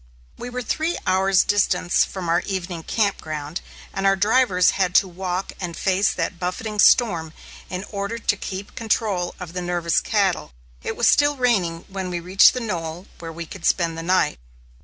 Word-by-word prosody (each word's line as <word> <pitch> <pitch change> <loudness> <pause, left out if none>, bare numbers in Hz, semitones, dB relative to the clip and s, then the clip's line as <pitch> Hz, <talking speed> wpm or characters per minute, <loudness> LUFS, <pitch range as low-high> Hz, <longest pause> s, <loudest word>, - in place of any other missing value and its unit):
We 245 - -7
were 250 0 -4
three 320 +8 -1
hours' 190 +1 +3
distance 200 -3 +2
from 185 -3 -5
our 170 +1 +3
evening 180 -3 -3
camp 200 +3 0
ground 155 +1 -5 0.3
and 195 0 0
our 195 - +4
drivers 205 -3 +3
had 185 -2 -1
to 195 - +5
walk 185 +1 -4
and 175 -2 -4
face 195 +1 +2
that 170 0 -3
buffeting 210 +4 -4
storm 170 -10 +4 0.4
in 185 +1 -4
order 200 +2 -3
to 215 -2 0
keep 195 0 -7
control 215 -5 -1
of 180 -2 -8
the 180 - -3
nervous 175 -1 +1
cattle. 195 - 0 0.3
It - - -4
was - - +3
still 290 0 +4
raining 195 -10 +1
when 190 -1 -5
we 175 -1 -3
reached 185 +7 +5
the - - -1
knoll 175 -6 -4
where 165 -1 -7
we 170 +1 -7
could 175 +2 -11
spend 170 -2 +1
the 165 - -5
night. 180 - +1
185 Hz, 180 wpm, -22 LUFS, 175-205 Hz, 0.4 s, to